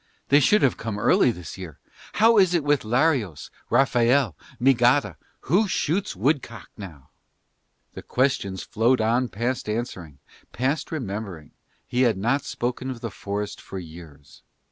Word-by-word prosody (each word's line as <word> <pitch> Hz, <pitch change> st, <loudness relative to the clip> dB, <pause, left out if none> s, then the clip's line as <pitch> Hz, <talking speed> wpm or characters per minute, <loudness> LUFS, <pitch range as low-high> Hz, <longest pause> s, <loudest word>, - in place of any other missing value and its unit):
They 140 Hz, -, +6 dB
should 210 Hz, +10 st, +3 dB
have 130 Hz, -, +2 dB
come 110 Hz, -2 st, -4 dB
early 105 Hz, -, +4 dB
this 90 Hz, -6 st, -6 dB
year. 85 Hz, -6 st, -9 dB, 0.4 s
How 225 Hz, 0 st, +5 dB
is 180 Hz, -2 st, +4 dB
it 165 Hz, -, +1 dB
with 145 Hz, -1 st, +2 dB
Larios, 120 Hz, -, 0 dB, 0.2 s
Raphael, 120 Hz, -, +3 dB, 0.2 s
Migada? 120 Hz, -, +3 dB, 0.3 s
Who 190 Hz, -, +2 dB
shoots 190 Hz, +2 st, -1 dB
woodcock 125 Hz, -, -2 dB
now?" 85 Hz, -10 st, -11 dB, 0.8 s
The -, -, -8 dB
questions 110 Hz, -8 st, -1 dB
flowed 120 Hz, +4 st, +1 dB
on 120 Hz, +3 st, +1 dB
past 120 Hz, +2 st, -3 dB
answering, 95 Hz, -, -5 dB, 0.4 s
past 140 Hz, +5 st, -1 dB
remembering: 100 Hz, -, -5 dB, 0.3 s
he 125 Hz, -, -1 dB
had 115 Hz, -6 st, +3 dB
not 120 Hz, +8 st, 0 dB
spoken 125 Hz, +2 st, -3 dB
of 125 Hz, -3 st, -6 dB
the 115 Hz, -, -5 dB
forest 100 Hz, +1 st, -5 dB
for 95 Hz, -, -8 dB
years. 80 Hz, -5 st, -12 dB
120 Hz, 145 wpm, -24 LUFS, 100-135 Hz, 0.8 s, They